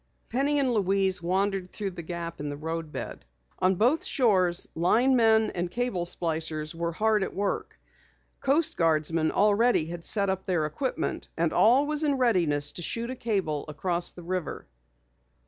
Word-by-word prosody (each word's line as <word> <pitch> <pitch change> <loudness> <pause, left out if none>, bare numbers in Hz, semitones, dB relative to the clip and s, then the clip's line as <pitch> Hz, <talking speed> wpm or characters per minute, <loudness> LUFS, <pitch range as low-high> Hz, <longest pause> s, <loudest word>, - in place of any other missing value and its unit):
Penny 280 +5 +1
and 270 -3 +2
Louise 195 -3 +1
wandered 190 +1 -1
toward 195 -4 -5
the 175 - -6
gap 170 0 -6
in 145 0 -4
the 145 - -5
roadbed. 160 0 -6 0.4
On 185 +1 +2
both 245 - +2
shores, 185 - +2
linemen 225 +4 +3
and 175 0 -3
cable 235 -6 -2
splicers 160 -2 0
were 170 0 -3
hard 215 +4 +1
at 190 - -3
work. 200 0 -3 0.6
Coast 310 +4 +2
Guardsmen 160 -1 +1
already 210 -2 +3
had 170 +1 -7
set 200 +1 +2
up 190 0 -5
their 175 -5 +1
equipment 255 - -3
and - - 0
all 255 +6 +4
was 300 0 +2
in 295 -3 +2
readiness 175 - +1
to - - -8
shoot 230 +8 -2
a - - -5
cable 190 - -2
across 175 +3 -1
the 175 - -12
river. 180 -1 -4
185 Hz, 160 wpm, -27 LUFS, 165-230 Hz, 0.6 s, all